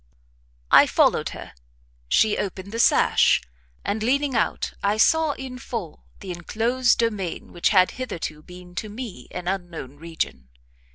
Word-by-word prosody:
I - - +8
followed - - +2
her; - - -9 0.6
she 215 - +4
opened 195 0 -4
the 230 - -4
sash, - - +4 0.5
and 210 +2 -1
leaning 275 +4 +1
out 230 - 0
I 205 +1 +1
saw 320 +6 +4
in 260 -2 -8
full 220 -10 -6 0.2
the 190 - -6
enclosed 230 +8 +1
demesne 210 -7 -2
which 175 - +1
had 185 -3 +4
hitherto 165 -10 -5
been 180 +2 -13
to 215 - -3
me 225 -1 -8
an 180 -1 -7
unknown 175 -8 -4
region. 160 - -5
200 Hz, 140 wpm, -24 LUFS, 175-235 Hz, 0.6 s, I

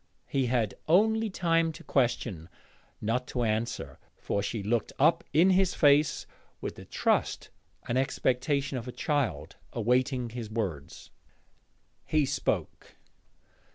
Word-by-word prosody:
He 135 -2 0
had 120 -4 +1
only 220 +6 +3
time 165 -3 +1
to - - -12
question, 115 - -1 0.5
not 120 +4 -1
to 125 - -2
answer, 110 +1 -2 0.2
for 100 - -2
she 105 0 -3
looked 110 +2 0
up 155 +5 +4
in 175 +5 +5
his 185 0 +3
face 145 0 +4 0.3
with - - -4
the - - -12
trust - - 0 0.4
and 120 +2 +1
expectation 135 +1 0
of 120 - -9
a - - -4
child, 115 - -1 0.2
awaiting 125 +1 +1
his 115 -2 -6
words. 95 -11 -5 0.9
He 155 -2 +2
spoke. - - -3
125 Hz, 125 wpm, -29 LUFS, 115-150 Hz, 0.9 s, in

